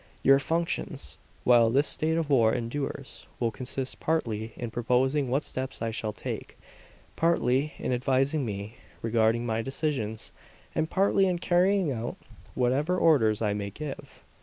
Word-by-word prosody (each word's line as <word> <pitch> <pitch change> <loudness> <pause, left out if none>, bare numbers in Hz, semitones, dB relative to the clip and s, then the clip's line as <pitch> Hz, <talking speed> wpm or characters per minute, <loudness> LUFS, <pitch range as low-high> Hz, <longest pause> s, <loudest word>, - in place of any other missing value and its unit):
Your 135 +1 +6
functions, 165 +4 -2 0.2
while 120 -2 +6
this 135 +5 +3
state 160 +2 +1
of 160 -3 -1
war 115 -5 +5
endures, 135 +3 -5
will 115 -2 +1
consist 130 +2 -4
partly 115 -9 -1
in 120 -2 -5
proposing 130 +4 +1
what 135 +4 +1
steps 130 +1 -5
I 115 0 -2
shall 110 -1 -3
take, - - -6 0.6
partly, 150 -4 +2
in - - -2
advising 135 +4 +1
me 105 -1 -5 0.3
regarding 115 +1 +2
my 115 -1 0
decisions, 130 -5 -3 0.4
and 160 0 0
partly 195 0 +3
in 180 -1 +1
carrying 180 0 +2
out 120 -2 -4 0.4
whatever 140 +8 +1
orders 115 - +3
I 105 -1 +1
may 100 -1 -3
give." 145 +7 -8
130 Hz, 145 wpm, -28 LUFS, 115-150 Hz, 0.6 s, Your